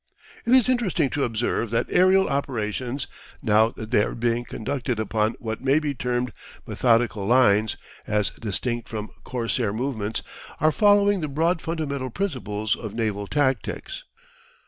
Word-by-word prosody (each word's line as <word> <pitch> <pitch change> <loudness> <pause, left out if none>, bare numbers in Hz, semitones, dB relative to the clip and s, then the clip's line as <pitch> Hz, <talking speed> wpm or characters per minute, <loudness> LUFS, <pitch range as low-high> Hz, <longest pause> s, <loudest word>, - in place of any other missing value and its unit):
It 245 - +6
is 255 -4 +5
interesting 200 - +1
to 145 - 0
observe 115 0 -1
that 115 +1 +1
aerial 190 +1 +5
operations, 130 -1 -2 0.4
now 110 0 +4
that 110 -1 -9
they - - +5
are - - -2
being 120 0 0
conducted 125 -1 -3
upon 110 +1 0
what 110 -2 -5
may 135 +2 +3
be 150 -2 0
termed 125 -2 -2 0.3
methodical 115 -4 +1
lines 110 -3 +4 0.3
as 105 -1 +1
distinct 115 +2 -3
from 110 -1 -5
corsair 120 -3 -1
movements, 110 -2 -2 0.4
are 155 - +4
following 205 +1 +4
the 155 - -1
broad 165 +4 +1
fundamental 140 -5 -3
principles 115 - -2
of 110 -2 -7
naval 105 -3 -1
tactics. 145 - -1
120 Hz, 145 wpm, -24 LUFS, 110-145 Hz, 0.4 s, It